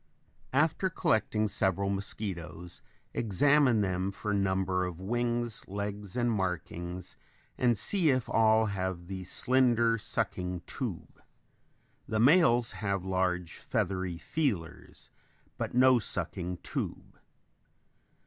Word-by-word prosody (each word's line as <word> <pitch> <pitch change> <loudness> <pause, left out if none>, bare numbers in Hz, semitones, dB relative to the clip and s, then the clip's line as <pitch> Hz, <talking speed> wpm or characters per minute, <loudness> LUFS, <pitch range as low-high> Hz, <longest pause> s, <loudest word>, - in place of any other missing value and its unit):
After 160 +6 +2
collecting 110 - +1
several 100 0 0
mosquitoes 90 -4 -5 0.3
examine 125 +2 +3
them 95 -1 0
for 105 +1 -3
number 95 -2 +1
of 90 -2 -4
wings, 120 +3 -1
legs 100 +1 -5
and 120 -1 +2
markings 90 -2 -3 0.4
and 120 -3 +2
see 180 - +2
if 130 -3 +1
all 110 0 +4
have 95 -3 -3
the 95 0 -6
slender 120 +1 +3
sucking 90 -3 -2
tube. - - -6 0.9
The 110 - -1
males 120 -3 +5
have 100 -3 -2
large 90 -2 -1
feathery 95 -3 -2
feelers, 105 - -3 0.5
but - - -3
no 130 0 +6
sucking 90 -3 -3
tube. - - -5
100 Hz, 105 wpm, -30 LUFS, 95-120 Hz, 0.9 s, no